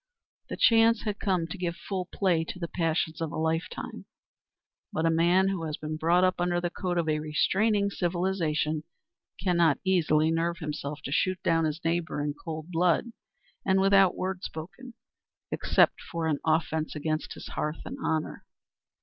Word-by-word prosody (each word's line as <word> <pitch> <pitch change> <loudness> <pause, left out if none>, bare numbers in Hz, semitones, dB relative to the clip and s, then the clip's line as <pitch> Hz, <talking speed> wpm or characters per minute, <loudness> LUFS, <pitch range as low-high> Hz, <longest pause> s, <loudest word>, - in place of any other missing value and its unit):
The - - -4
chance 230 0 +5
had 210 -2 -3
come 185 -5 +1
to 185 +3 -7
give 170 -2 -2
full 185 0 -4
play 180 -5 +1
to 180 - -6
the 170 -2 -4
passions 165 -1 -1
of 160 -2 -2
a - - -5
lifetime. 160 +1 -3 0.9
But 160 - -1
a 165 - +4
man 175 +4 +4
who 185 -4 -2
has 155 -1 -3
been 155 0 -4
brought 170 +3 +3
up 185 -1 +2
under 175 0 +1
the 175 0 -2
code 180 -1 -2
of 170 -2 0
a 155 -1 +1
restraining 200 +7 +1
civilisation 170 -4 -1 0.6
cannot 170 -6 +3
easily 160 -4 +3
nerve 165 +1 0
himself 150 -2 -5
to 140 - -5
shoot 185 +5 +1
down 165 -1 +2
his 155 +1 -3
neighbour 165 -2 0
in 145 0 -1
cold 160 +2 -7
blood 175 +7 +2 0.5
and 190 0 +3
without 195 -1 +5
word 185 0 -3
spoken, 185 +10 -8 0.6
except - - +3
for 165 -1 -2
an 155 -3 0
offence 160 0 0
against 155 +1 -2
his - - -9
hearth 150 +1 -3
and 270 +2 -7
honour. 155 -1 -2
170 Hz, 170 wpm, -28 LUFS, 155-185 Hz, 0.9 s, chance